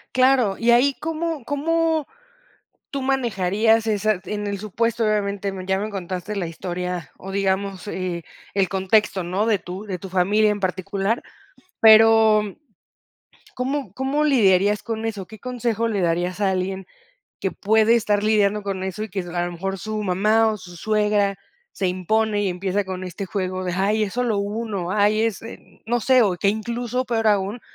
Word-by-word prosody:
Claro, 255 -6 +3
y 235 +1 +3
ahí 255 +4 +4
¿cómo 325 -2 -3
cómo 320 +3 0 0.8
tú 275 - -3
manejarías 225 -4 +1
esa? 210 -2 +1
en 210 0 -3
el 200 -1 -3
supuesto, 230 +3 -1
obviamente, 200 -2 0
ya 190 0 +2
me 210 +2 -3
contaste 185 +1 -5
la 180 -3 -2
historia 180 +1 -5
o, 195 - -8
digamos, 195 0 -1
eh, 180 -3 -3 0.3
el 195 -2 +1
contexto, 190 0 +1
¿no?, 185 +5 -1
de 220 -3 +2
tu 180 +3 -7
de 190 -4 -5
tu 195 - -8
familia 200 +4 +3
en 205 -1 -4
particular, 195 +4 -1 0.6
pero 220 -1 +7
mm, 205 -2 -6 1.0
¿cómo 260 -5 -3
cómo 270 +5 0
lidiarías 205 -6 +3
con 225 0 -4
eso? 210 -4 -4
¿Qué 220 0 -12
consejo 235 -1 -1
le 210 -4 -1
darías 175 +3 0
a 195 -2 +3
alguien 190 +1 -2 0.6
que 190 - -1
puede 220 +2 +3
estar 210 -3 +1
lidiando 210 -1 +2
con 195 -2 -3
eso? 190 +3 -4
Y 220 - -9
que 195 - -5
es 180 - -7
a 175 0 -1
lo 175 - -5
mejor 195 +3 -3
su 215 +2 -4
mamá 210 +4 +3
o 215 - -1
su 180 -2 -12
suegra 210 0 +1 0.4
se 190 - -2
impone, 205 +3 0
y - - +1
empieza 190 +3 -1
con 185 0 -5
este 185 +2 -6
juego 185 -1 -3
de: 180 -1 -2
"Ay, 205 +3 +1
es 200 - -6
solo 240 -4 0
1, 200 -3 -3
ay 210 +1 +3
es", 225 -3 -2
eh, 225 - -12
no 240 +1 +1
sé, 255 +2 +5
o 195 -5 +1
que 200 - +1
incluso 235 +4 -2
peor 225 -2 0
aún, 205 +3 0
205 Hz, 175 wpm, -22 LUFS, 190-225 Hz, 1.0 s, pero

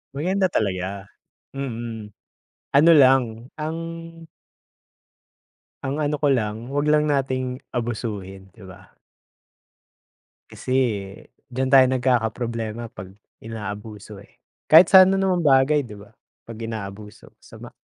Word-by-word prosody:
Maganda 185 +6 0
talaga, 95 - -2 0.5
mm, 115 -5 -6 0.6
ano 150 +4 +6
lang 135 -2 +6 0.4
ang 155 +2 -3 2.1
Ang, 140 +3 -2
ano, 150 0 -1
ko 145 -1 +2
lang 115 +1 -3
'wag 145 +1 0
lang 150 0 +3
nating 130 -3 -2
abusuhin, 105 -5 -5
'di 95 +2 -16
ba? 95 0 -15 1.5
Kasi - - -8 0.8
diyan 130 +2 -1
tayo 135 -1 +7
nagkakaproblema 120 -2 -1
pag 95 -4 -11 0.3
inaabuso, 105 -1 -8
eh, - - -26 0.3
kahit 165 +3 +9
sa 190 +1 +9
ano 195 +1 +1
na 195 - +1
naman 180 -2 0
bagay, 140 +1 +3
di 115 -4 -10
ba, 100 +1 -15 0.4
pag 115 -1 -9
inaabuso 105 0 -8
sama - - -12
120 Hz, 115 wpm, -22 LUFS, 105-145 Hz, 2.1 s, kahit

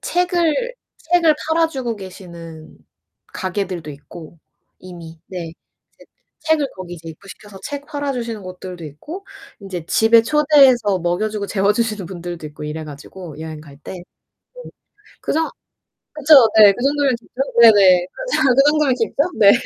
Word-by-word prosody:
책을 355 +7 0 0.4
책을 335 -3 +5
팔아 325 0 +2
주고 260 -6 -4
계시는 170 -5 -11 0.6
가게들도 185 -4 -4
있고 155 +3 -12 0.4
이미 170 -3 -11
네. 170 -3 -6 0.4
제 - - -18 0.4
책을 315 -3 +1
거기 185 -2 -8
이제 165 -1 -11
입고시켜서 195 +4 -13
책 285 0 -6
팔아 285 -2 -3
주시는 230 -4 -5
곳들도 185 -1 -9
있고 295 - -9 0.4
인제 185 -5 -7
집에 225 +3 +4
초대해서 270 -7 +4
먹여 175 +5 -1
주고 210 -1 -4
재워 200 0 +1
주시는 215 -4 -2
분들도 175 -2 -7
있고 150 0 -10
이래 150 +1 -5
가지고 155 +2 -10
여행 160 -1 -7
갈 145 -2 -15
때. - - -9 0.5
네. - - -14 0.5
그래서 320 +1 -1 0.6
그쵸, 305 +1 +3 0.2
네, 210 -2 +9
그 240 - -6
정도면 280 -2 +2
좋죠. 255 +3 -6
네네. 195 -6 +7
그죠, 310 - -1
그 275 - +6
정도면 300 -3 +2
깊죠? 285 +8 -1
네. 200 -2 +8
205 Hz, 300 characters per minute, -19 LUFS, 175-285 Hz, 0.6 s, 네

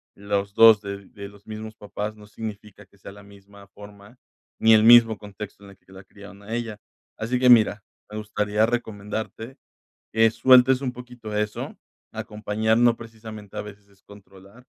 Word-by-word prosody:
los 100 0 -3
2 110 -2 +7
de 100 -1 -8
de 100 -1 -10
los 100 0 -19
mismos 110 0 -8
papás, 105 0 -6
no 105 -1 -15
significa 105 -2 -9
que 100 - -27
sea 100 - -11
la 100 0 -15
misma 100 0 -17
forma, 100 +3 -15 0.4
ni 110 0 +6
el 110 0 +5
mismo 115 -2 +7
contexto 100 0 -10
en 100 - -13
el 95 - -18
que 95 - -24
la 95 0 -13
criaron 100 0 -15
a 110 +3 -8
ella. 115 -3 -4 0.4
Así 120 +3 -2
que 125 0 +4
mira, 110 -3 +5 0.3
me 105 - -8
gustaría 105 0 0
recomendarte 110 +1 -5 0.6
que 115 0 +4
sueltes 130 +2 +5
un 130 -2 -2
poquito 125 -3 -9
eso. 105 0 -3 0.4
Acompañar 110 +1 -1
no 120 -1 +4
precisamente 110 -3 -11
a - - -2
veces 105 -1 -13
es 100 -1 -28
controlar, 100 +3 -17
105 Hz, 175 wpm, -24 LUFS, 100-115 Hz, 0.6 s, 2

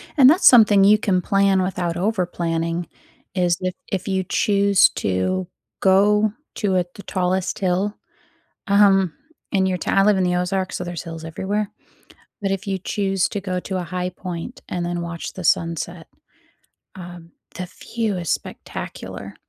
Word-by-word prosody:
And 270 -5 +8
that's 330 +6 +5
something 210 -5 +7
you 210 +2 +6
can 190 -3 +1
plan 195 0 +2
without 180 -2 -2
overplanning 175 -3 -1 0.5
is 175 -2 +2
if 185 0 -1 0.2
if 185 -2 -2
you 190 -1 0
choose 200 +1 +3
to 100 - -1 0.3
go 205 +2 +4 0.2
to 200 -3 0
a 180 - +1
the 200 - -10
tallest 185 +1 -1
hill, 195 +2 0 0.7
um, 195 -4 +4 0.4
in 190 -1 +2
your 185 -1 0
tow - - -3
I 195 - +4
live 205 -1 +4
in 190 - +2
the 180 0 +1
Ozarks, 185 +1 -1
so - - -4
there's 175 -1 -5
hills 165 -2 -8
everywhere. 195 +6 -2 0.7
But 195 - 0
if 195 +2 -3
you 195 -1 -1
choose 195 -1 0
to 205 - -3
go 185 -2 -3
to 190 +1 -4
a - - -2
high 180 +1 -3
point 180 +7 -7
and 175 -1 -3
then 175 0 -2
watch 170 -1 -6
the 185 - -8
sunset, 165 +1 0 0.9
um, 175 -2 -10 0.2
the 180 -1 -5 0.3
view 225 -4 0
is 170 -3 -3
spectacular. - - -6
185 Hz, 165 wpm, -22 LUFS, 175-200 Hz, 0.9 s, And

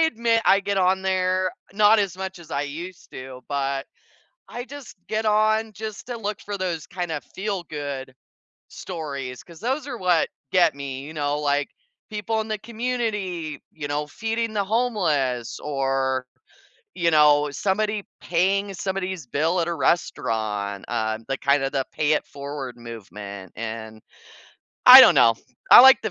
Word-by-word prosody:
admit 230 -7 +2
I 195 - +5
get 200 0 -1
on 190 +1 +2
there- 185 0 +1 0.2
not 210 +2 +5
as 195 -3 -1
much 190 -1 -6
as 165 -2 -14
I 140 -1 -1
used 170 +5 -8
to, 130 0 -9
but, 140 -1 -2 0.7
I 245 - -5
just 280 -2 -11
get 220 0 -1
on 215 +1 +2
just 215 +1 -7
to 245 -2 -5
look 210 -2 -4
for 205 -1 -5
those, 175 -5 -3
kind 175 -2 -4
of 150 - -3
feel-good 150 -9 -4 0.6
stories, 140 -7 -6
'cause 170 -2 -15
those 265 +5 -2
are 245 -4 -5
what 180 -5 +2 0.2
get 175 -3 +5
me, 135 -2 -6
you 155 - -9
know? 145 -1 -1
Like, 145 -1 0 0.4
people 215 +1 -2
in 220 - -6
the 215 -1 -2
community, 215 - -3
you 145 -2 -6
know, 150 +1 -2
feeding 225 +6 -3
the 205 -2 0
homeless 175 - 0
or, 135 -2 -1 0.7
you 170 -1 +1
know, 150 -1 +5
somebody 210 +5 -1 0.2
paying 195 +3 +1
somebody's 190 -4 -4
bill 160 +8 +1
at 165 - -1
a 170 - -1
restaurant, 105 - -1
uh, 110 -2 -1
the 135 - -2
kind 140 +1 +2
of 135 - -1
the 135 -2 -1
pay-it-forward 145 -3 -2
movement, 100 -5 -9
and, 110 -1 -6 0.9
I - - +13
don't - - +8
know, 115 - +6 0.4
I - - +12
like 265 +1 +8
the 220 - -2
170 Hz, 155 wpm, -24 LUFS, 140-210 Hz, 0.9 s, I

